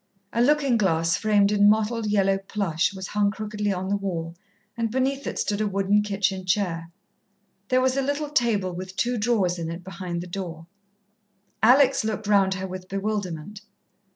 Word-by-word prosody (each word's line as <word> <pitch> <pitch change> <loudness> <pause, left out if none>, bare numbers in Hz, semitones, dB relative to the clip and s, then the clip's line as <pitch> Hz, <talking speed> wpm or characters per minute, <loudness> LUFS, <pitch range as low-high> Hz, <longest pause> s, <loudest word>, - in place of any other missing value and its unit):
A 235 - +1
looking 280 -2 +3
glass 165 -5 +2
framed 205 -2 +3
in 205 0 +5
mottled 220 +1 +1
yellow 195 -2 +2
plush 195 -4 -1
was 190 -1 -7
hung 205 -1 +2
crookedly 210 0 -3
on 190 0 -3
the 200 - +1
wall, 170 -5 -3 0.4
and 230 -1 -1
beneath 265 +3 -1
it - - -4
stood 205 +1 -1
a 215 - +1
wooden 200 +1 +2
kitchen 195 -2 -1
chair. 175 -3 -1 0.8
There 255 +2 +3
was 260 0 +2
a 275 - +1
little 285 +2 -2
table 215 -9 +1
with 185 +1 -7
two 245 +4 0
drawers 205 -6 +1
in 165 -1 -3
it 170 +2 -6
behind 175 -2 -5
the - - -6
door. 175 -3 -6 1.0
Alex 255 +3 +5
looked 215 -1 -3
round 195 -2 +3
her 190 0 -4
with 185 0 -8
bewilderment. 195 -2 -4
200 Hz, 175 wpm, -25 LUFS, 185-220 Hz, 1.0 s, in